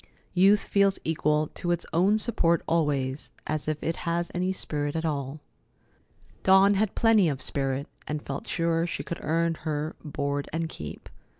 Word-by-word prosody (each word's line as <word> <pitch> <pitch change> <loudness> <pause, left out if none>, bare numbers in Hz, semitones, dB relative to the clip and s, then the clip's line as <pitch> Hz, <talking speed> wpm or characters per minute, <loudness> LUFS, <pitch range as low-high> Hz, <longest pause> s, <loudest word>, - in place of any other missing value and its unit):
Youth 195 +3 +5
feels 200 -1 +3
equal 150 -1 +1
to 175 - -4
its 175 -1 0
own 190 +6 +4
support 170 -7 +1
always, 145 -4 0 0.2
if 155 0 -2
it 165 - -1
has 170 0 -2
any 180 +1 0
spirit 145 -5 -2
at 160 0 -1
all. 145 -1 -3 1.0
Dawn 190 +1 +6
had 205 0 0
plenty 220 -6 +4
of 140 -3 -3
spirit, 135 +1 -1 0.2
and 150 0 -2
felt 140 -1 -6
sure 165 0 +1
she - - -4
could 170 - -5
earn 165 +2 +1
her 155 0 -2
"board 140 -1 -2
and 165 +1 -1
keep." 75 - -8
165 Hz, 160 wpm, -27 LUFS, 145-180 Hz, 1.0 s, Dawn